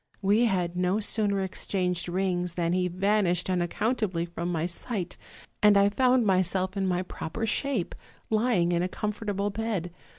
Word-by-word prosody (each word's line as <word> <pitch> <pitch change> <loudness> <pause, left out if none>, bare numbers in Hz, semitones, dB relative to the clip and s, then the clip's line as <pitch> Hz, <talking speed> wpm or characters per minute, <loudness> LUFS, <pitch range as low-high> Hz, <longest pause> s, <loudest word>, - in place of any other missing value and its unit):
We 210 +5 +4
had 180 -5 0
no 180 +3 +1
sooner 205 -2 +1
exchanged 180 -2 -1
rings 180 -1 -1
than 170 -1 0
he 180 0 +1
vanished 185 -1 +1
un 180 - +1
accountably 190 -1 -1
from 170 +1 -4
my 165 -1 -1
sigh; 180 +3 -3 0.6
and 210 -1 +6
I 200 0 +5
found 250 +2 +3
myself 185 0 +1
in 195 -1 0
my 180 0 0
proper 185 +5 -5
shape, 240 -4 0 0.4
lying 215 -6 +2
in 170 0 +1
a 180 - 0
comfortable 205 0 -2
bed. 205 -5 -3
190 Hz, 160 wpm, -27 LUFS, 175-210 Hz, 0.6 s, and